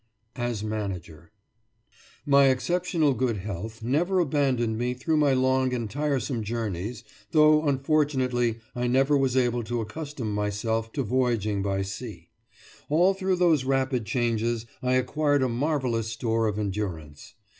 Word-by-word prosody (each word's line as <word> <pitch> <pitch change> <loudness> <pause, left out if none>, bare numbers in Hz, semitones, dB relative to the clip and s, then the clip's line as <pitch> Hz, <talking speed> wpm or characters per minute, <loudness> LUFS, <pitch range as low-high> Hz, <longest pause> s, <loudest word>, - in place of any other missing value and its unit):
AS 120 -3 -2
MANAGER 95 -7 -5 0.9
My 140 -1 +5
exceptionally 160 +2 +1
good 125 -4 0
health 105 +3 -6
never 165 +10 +1
abandoned 135 -8 +1
me 125 +1 -1
through 155 +5 0
my 145 -2 +4
long 130 0 +2
and 115 -2 -3
tiresome 140 -2 -1
journeys, 110 0 -4 0.3
though 155 0 +5
unfortunately 135 -4 +1 0.2
I 125 0 -1
never 135 +4 +3
was 135 -2 +1
able 120 -2 +1
to 120 +2 -2
accustom 120 0 -5
myself 105 +2 -1
to 140 - -1
voyaging 115 -4 0
by 95 0 -1
sea. 100 -3 -8 0.6
All 175 +6 +4
through 190 -1 0
those 170 -6 +3
rapid 130 -3 0
changes 115 -1 0 0.2
I 125 0 +1
acquired 145 +2 +1
a - - +2
marvellous 125 -3 -1
store 115 0 0
of 105 -1 -2
endurance. 95 -8 -5
125 Hz, 135 wpm, -26 LUFS, 110-140 Hz, 0.9 s, My